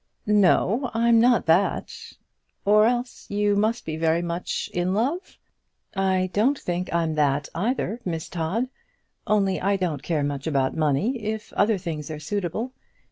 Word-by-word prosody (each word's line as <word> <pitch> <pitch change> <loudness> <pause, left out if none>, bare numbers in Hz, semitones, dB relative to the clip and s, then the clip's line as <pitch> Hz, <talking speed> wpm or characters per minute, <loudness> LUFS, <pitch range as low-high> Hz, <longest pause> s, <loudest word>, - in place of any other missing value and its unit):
"No, 210 +4 +3
I'm 230 0 +4
not 245 0 +4
that." 170 +5 +2 0.7
"Or 210 +2 +5
else 245 +1 -3
you 205 0 +1
must 220 +3 0
be 155 -1 -4
very 165 +1 +1
much 170 +1 -3
in 180 +2 0
love?" 280 - -2 0.6
"I 190 -1 +1
don't 255 +8 +2
think 180 -3 -3
I 170 0 +1
am 160 -1 -1
that 145 -1 +1
either, 230 +3 -1
Miss 165 -3 -3
Todd; 180 +9 -2 0.6
only 200 -3 +2
I 200 +1 +2
don't 175 -6 -2
care 155 -4 -1
much 140 0 -3
about 135 -4 +1
money 160 - +1
if 215 0 -4
other 210 0 +2
things 165 -5 -5
are 155 -1 -5
suitable. 200 - -3
190 Hz, 155 wpm, -24 LUFS, 160-220 Hz, 0.7 s, Or